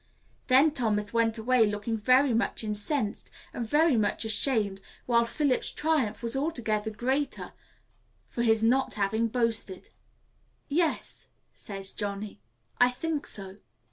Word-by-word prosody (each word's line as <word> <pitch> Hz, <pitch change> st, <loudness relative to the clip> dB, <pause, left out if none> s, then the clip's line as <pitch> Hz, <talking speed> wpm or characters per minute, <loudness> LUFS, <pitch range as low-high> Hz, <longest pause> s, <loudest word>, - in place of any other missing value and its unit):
Then 270 Hz, +4 st, +5 dB
Thomas 210 Hz, -6 st, -1 dB
went 230 Hz, -1 st, +2 dB
away 230 Hz, 0 st, +3 dB
looking 205 Hz, +2 st, -2 dB
very 255 Hz, +4 st, +3 dB
much 230 Hz, 0 st, -1 dB
incensed 210 Hz, +2 st, -2 dB, 0.2 s
and 240 Hz, -, -3 dB
very 295 Hz, +5 st, +3 dB
much 215 Hz, 0 st, 0 dB
ashamed, 220 Hz, -4 st, 0 dB, 0.2 s
while 235 Hz, -1 st, +3 dB
Philip's 270 Hz, +2 st, 0 dB
triumph 295 Hz, -9 st, 0 dB
was 235 Hz, +2 st, -1 dB
altogether 230 Hz, -8 st, -1 dB
greater 260 Hz, +6 st, -2 dB, 0.7 s
for 235 Hz, -, -4 dB
his 225 Hz, -2 st, +3 dB
not 255 Hz, -1 st, +2 dB
having 215 Hz, +3 st, 0 dB
boasted." 225 Hz, -5 st, -2 dB, 0.8 s
"Yes," 325 Hz, +2 st, -1 dB, 0.3 s
says 195 Hz, -1 st, -8 dB
Johnny, 200 Hz, -, -5 dB, 0.4 s
"I 245 Hz, -, +6 dB
think 300 Hz, +4 st, -3 dB
so." 195 Hz, -1 st, -6 dB
230 Hz, 125 wpm, -28 LUFS, 210-265 Hz, 0.8 s, I